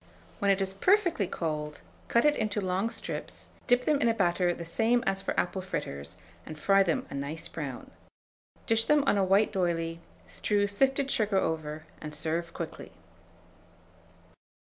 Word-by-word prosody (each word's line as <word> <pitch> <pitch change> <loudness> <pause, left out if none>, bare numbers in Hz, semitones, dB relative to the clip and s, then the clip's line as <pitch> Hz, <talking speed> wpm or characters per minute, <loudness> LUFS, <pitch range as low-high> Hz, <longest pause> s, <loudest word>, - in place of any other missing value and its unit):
When 200 - +1
it 195 0 +3
is 190 0 -4
perfectly 345 - +2
cold, 150 -3 -3 0.3
cut 235 - +3
it 295 0 +5
into 215 -3 -1
long 190 +3 0
strips, 230 - -6 0.2
dip 245 0 +3
them 295 -2 +2
in 235 - +4
a 225 - +1
batter 175 -2 +2
the 170 -1 -5
same 230 +8 +2
as 195 -2 0
for - - -1
apple 190 +1 -1
fritters, 85 - -5 0.3
and 155 - -9
fry 195 +5 +4
them 175 -4 +1
a - - -5
nice 140 +3 -4
brown. 140 -6 -6 0.7
Dish 225 0 +3
them 300 +1 +4
on 205 - +3
a - - +3
white 195 +3 +3
d'oyley, 165 -3 -1 0.3
strew 205 -1 0
sifted 270 +6 +1
sugar 210 -3 +2
over, 155 -3 -2 0.2
and 150 0 -6
serve 165 +2 -2
quickly. 165 -1 -7
190 Hz, 165 wpm, -29 LUFS, 165-225 Hz, 0.7 s, it